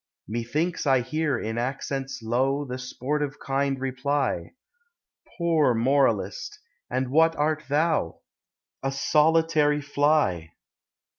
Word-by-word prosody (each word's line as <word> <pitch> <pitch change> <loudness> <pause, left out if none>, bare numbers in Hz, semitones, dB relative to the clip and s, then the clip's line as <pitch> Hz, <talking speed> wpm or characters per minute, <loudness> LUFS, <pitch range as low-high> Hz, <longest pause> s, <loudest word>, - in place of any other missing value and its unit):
Methinks 145 - -2
I 135 -2 +4
hear 145 +2 -1
in 110 0 -3
accents 135 0 -4
low 135 +5 0
The 130 -1 -5
sportive 145 +3 -3
kind 135 0 -1
reply: 135 -6 -1 0.8
Poor 160 -7 +2
moralist! 115 -5 +1 0.3
and 130 0 -2
what 165 +2 +4
art 150 +1 0
thou? 150 - 0 0.6
A 135 - -1
solitary 150 +1 +3
fly 145 - +1
135 Hz, 100 wpm, -25 LUFS, 125-150 Hz, 0.8 s, I